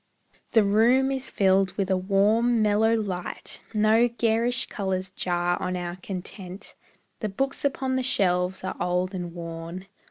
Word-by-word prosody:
The 225 -2 +6
room 235 +7 +4
is 265 -1 -3
filled 190 -1 +2
with 195 -2 -1
a - - +4
warm, 215 +5 +2
mellow 215 +2 +3
light, 185 -5 -4
No 220 +2 +4
garish 235 +1 +1
colours 190 -2 -3
jar 175 -1 -1
on 185 - -2
our 175 0 -5
content, 185 +1 -7 0.5
The 215 - -2
books 270 +8 -2
upon 265 -2 0
the - - +1
shelves 185 -8 +1
are 185 - -3
old 180 +2 0
and 175 -2 -4
worn. 170 +2 -7
195 Hz, 150 wpm, -26 LUFS, 180-230 Hz, 0.5 s, The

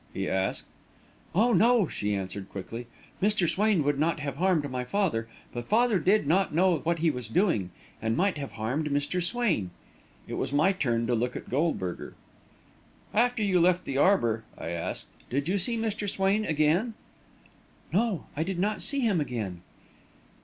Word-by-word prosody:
he - - -2
asked. 95 0 -1 0.7
"Oh, 230 +5 +4
no," 225 0 +4
she 105 -6 -2
answered, 95 0 -5
quickly; 115 +5 -7 0.3
"Mr. 205 -3 +2
Swain 205 -2 +2
would 145 0 +1
not 165 +1 +1
have 140 -2 -4
harmed 175 -4 +2
my 125 -1 -2
father, 135 - 0 0.3
but 120 0 -5
father 230 -2 +3
did 200 -1 +3
not 170 +1 +2
know 180 -2 +4
what 170 +2 0
he 165 0 +2
was 125 -4 -5
doing 115 - +1 0.3
and 110 0 0
might 195 +2 +2
have 140 - -6
harmed 130 +8 -2
Mr. 145 +5 0
Swain." 175 - 0 0.6
It - - -6
was 135 - -2
my 150 +7 +4
turn 120 -11 0
to 120 - 0
look 120 +1 0
at - - -7
Goldberger. 130 - -1 1.0
"After 240 0 +2
you 190 -3 +3
left 180 +1 +3
the 135 0 -1
arbour," 115 - +3
I - - -5
asked, 85 -1 -3 0.2
"did 140 +4 -1
you 195 +3 +1
see 230 +6 -1
Mr. 215 -2 -2
Swain 195 +3 +1
again?" 160 +9 +1 1.0
"No, 210 -2 +1
I 150 - -1
did 185 +2 -2
not 205 +4 0
see 280 -1 -1
him 205 -9 +2
again." 105 -10 -4
165 Hz, 170 wpm, -28 LUFS, 125-200 Hz, 1.0 s, Oh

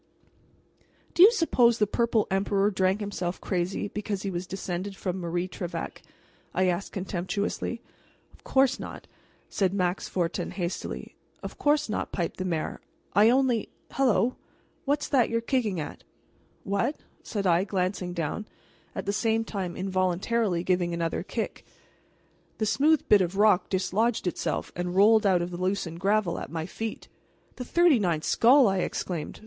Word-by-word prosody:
"Do - - +2
you 405 +5 +10
suppose 245 - +3
the 210 - +3
Purple 225 +1 +1
Emperor 195 +1 +2
drank 190 +1 +1
himself 185 -3 -3
crazy 185 +1 -2
because 205 -1 -4
he 195 - -2
was 180 0 -4
descended 190 +1 -4
from 185 -1 -3
Marie 175 +1 -2
Trevec?" 175 -1 -6 0.5
I 185 - +3
asked 180 +2 -1
contemptuously. 195 +5 -3 0.5
"Of - - -22
course 265 0 +2
not," - - -8 0.4
said 195 -1 0
Max 180 -1 0
Fortin 175 -3 -1
hastily. 175 -2 -5 0.3
"Of - - -7
course 295 0 +2
not," 215 - -3
piped 170 -3 -3
the 185 - -3
mayor. 165 -4 -2 0.3
"I 210 +2 +6
only 250 -3 +2 0.2
Hellow! 250 -2 +2 0.5
what's 290 +1 0
that 260 -5 +3
you're 230 - +1
kicking?" 230 -6 0 0.8
"What?" 200 +9 0 0.3
said 200 -3 -4
I, 175 0 +4
glancing 185 -2 -2
down, 170 +5 -3 0.5
at - - -4
the 200 - -1
same 225 +2 +1
time 190 -6 -4
involuntarily 185 +1 0
giving 180 -2 +1
another 165 -1 -1
kick. - - -4 0.9
The 215 - 0
smooth 295 +7 +3
bit 205 -2 +6
of 180 +1 -1
rock 210 -2 +4
dislodged 200 +5 0
itself 180 - -2
and 175 +1 -3
rolled 215 +2 +5
out 180 -3 +3
of 175 - -5
the 175 - -5
loosened 185 -3 -2
gravel 200 -2 +1
at - - -7
my 160 -1 -4
feet. 220 +4 -6 0.5
"The 250 - -5
thirty 340 -3 +4
ninth 170 -6 0
skull!" 255 +2 +5
I 195 -1 +1
exclaimed. 170 -3 -3
195 Hz, 155 wpm, -27 LUFS, 180-225 Hz, 0.9 s, you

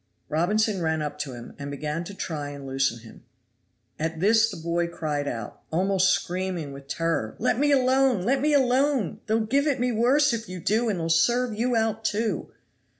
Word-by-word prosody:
Robinson 200 +5 +1
ran 160 -1 0
up 150 0 -5
to 145 -3 -4
him, 120 -1 -9
and 140 0 -5
began 150 +3 -3
to 200 - -8
try 150 -6 -4
and 140 -1 -8
loosen 135 -3 0
him. 115 - -14 0.8
At 160 +1 -2
this 220 +4 +4
the - - -7
boy 170 +1 -1
cried 150 -4 -3
out, 115 -5 -5
almost 190 +3 +2
screaming 180 -6 -1
with 140 0 -11
terror, 165 -8 -1
"Let 230 - +1
me 290 +1 +3
alone! 260 -5 +3
let 260 +6 +1
me 300 +1 +2
alone! 265 - +2
They'll 220 +1 +2
give 280 +6 +1
it 275 -3 +1
me 245 0 +1
worse 255 +5 +3
if 225 -2 -4
you 185 0 -6
do, 220 +7 +1
and 195 -5 -1
they'll 165 - -2
serve 240 +9 +2
you 240 +3 0
out, 225 -1 0
too!" 215 -4 -1
190 Hz, 195 wpm, -25 LUFS, 155-235 Hz, 0.8 s, this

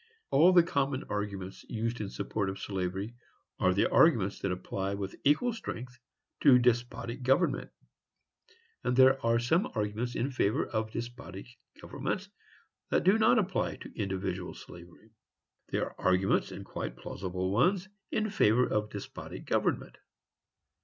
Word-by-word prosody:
All 160 +7 +6
the 175 -2 +7
common 140 -4 -1
arguments 100 -2 -4
used 115 +1 -2
in 100 - -3
support 100 -1 -2
of 95 - -5
slavery 95 +3 -3 0.5
are 95 - +4 0.2
arguments 110 - +4
that 95 - -1
apply 95 +2 -3
with 100 -1 -5
equal 155 - +3
strength 125 - -7 0.4
to 135 -4 +7
despotic 120 0 0
government, 135 +7 +2 1.1
and 125 - +1
there 130 +1 +6
are 115 0 +3
some 140 - +1
arguments 110 +3 -2
in 135 +4 -1
favor 110 -5 +1
of 110 -1 -2
despotic 120 -4 -7 0.3
governments - - -4 0.6
that - - +2
do 195 +5 +5
not 220 +2 +5
apply 195 -3 0
to - - -12
individual 95 -3 -3
slavery. 85 +5 -13 0.6
There - - -1
are - - -16
arguments, 95 +1 +2
and - - -8
quite - - -5
plausible 95 0 -4
ones, 180 - +2 0.2
in 215 -1 -1
favor 125 - +4
of 105 0 -1
despotic 100 -2 -8
government. - - -1
115 Hz, 140 wpm, -30 LUFS, 95-135 Hz, 1.1 s, the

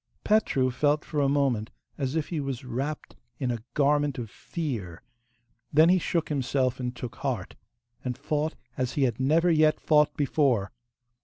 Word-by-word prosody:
Petru 140 -12 +2
felt 145 +4 +1
for 150 - -2
a 140 - +3
moment 135 -6 +1 0.3
as 135 0 -2
if 160 -2 -1
he 165 - -2
was 135 -2 -4
wrapped 135 +5 -4 0.2
in 130 -3 -1
a 115 -2 -3
garment 145 -1 +2
of 115 -4 -5
fear; 115 - -5 0.7
then 155 +3 +6
he 185 +1 +5
shook 170 -1 -1
himself 130 -3 0
and 125 -1 -3
took 120 -3 -7
heart, - - -3 0.5
and 125 -2 -3
fought 150 +2 -1 0.2
as 130 -1 -2
he 145 - +1
had 120 -3 0
never 160 +6 +3
yet 155 -1 +4
fought 150 -1 +3
before. 130 -8 +1
140 Hz, 165 wpm, -27 LUFS, 125-150 Hz, 0.7 s, then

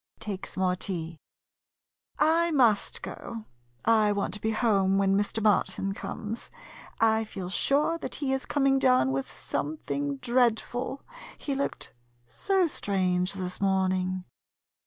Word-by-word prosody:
[Takes 195 -3 -6
more 185 -1 +2
tea.] 165 -4 -4 1.0
I 335 +2 +3
must 240 -9 +2
go. 225 -2 -7 0.4
I 215 -2 +4
want 200 -1 -1
to 210 - -6
be 220 - 0
home 200 -4 +2
when 195 0 +3
Mr. 205 +2 0
Martin 195 -2 +2
comes. 220 +3 -6 0.5
I 225 0 +3
feel 190 -4 -6
sure 295 - +2
that - - -5
he 275 -3 -1
is 265 - -2
coming 275 -2 +2
down 255 - +4
with 135 0 -2
something 145 -1 -3
dreadful 245 - 0 0.2
— - - -14
he 280 - 0
looked 275 +1 -3 0.3
so 380 - +1
strange 185 - 0
this 185 -1 -4
morning. 185 -1 +1
205 Hz, 135 wpm, -28 LUFS, 185-255 Hz, 1.0 s, I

